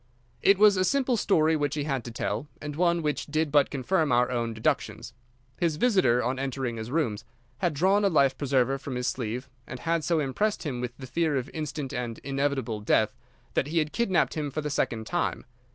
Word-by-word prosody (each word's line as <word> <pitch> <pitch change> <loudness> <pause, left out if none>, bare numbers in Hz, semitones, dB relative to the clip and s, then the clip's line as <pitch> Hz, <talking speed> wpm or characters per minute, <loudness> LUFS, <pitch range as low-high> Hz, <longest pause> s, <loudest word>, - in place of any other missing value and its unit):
It 200 0 +5
was 205 -1 +6
a 185 - +3
simple 265 +3 +2
story 160 -7 +3
which 145 -1 -1
he 150 - -1
had 135 -4 -2
to 120 - -6
tell, 120 +4 -3
and 150 -1 -6
one 170 0 +2
which 150 -1 -1
did 155 0 0
but 145 -1 +4
confirm 150 +3 0
our 125 +1 +3
own 120 -2 -1
deductions. 110 0 -2 0.5
His 165 -3 +1
visitor, 175 - +3
on 130 +2 -1
entering 130 -3 -3
his 110 +1 -5
rooms, 125 -8 -1 0.4
had 175 -5 0
drawn 190 +7 +3
a 200 - +4
life 140 -6 +3
preserver 135 -1 +1
from 135 -1 -6
his 125 0 -2
sleeve, 125 +1 -3 0.2
and 125 0 -7
had 165 -1 0
so 165 0 +1
impressed 180 +10 -1
him 130 -6 -3
with 125 0 -5
the 130 - -8
fear 155 +2 0
of 130 0 -4
instant 150 -3 -4
and 120 -3 -3
inevitable 135 -5 -1
death 105 - +2 0.4
that 135 - +1
he 165 +3 -2
had 155 -1 +1
kidnapped 195 -7 +1
him 150 -2 -2
for 155 +3 -3
the 150 0 -3
second 115 -5 -1
time. 175 +9 -2
145 Hz, 210 wpm, -27 LUFS, 125-165 Hz, 0.5 s, was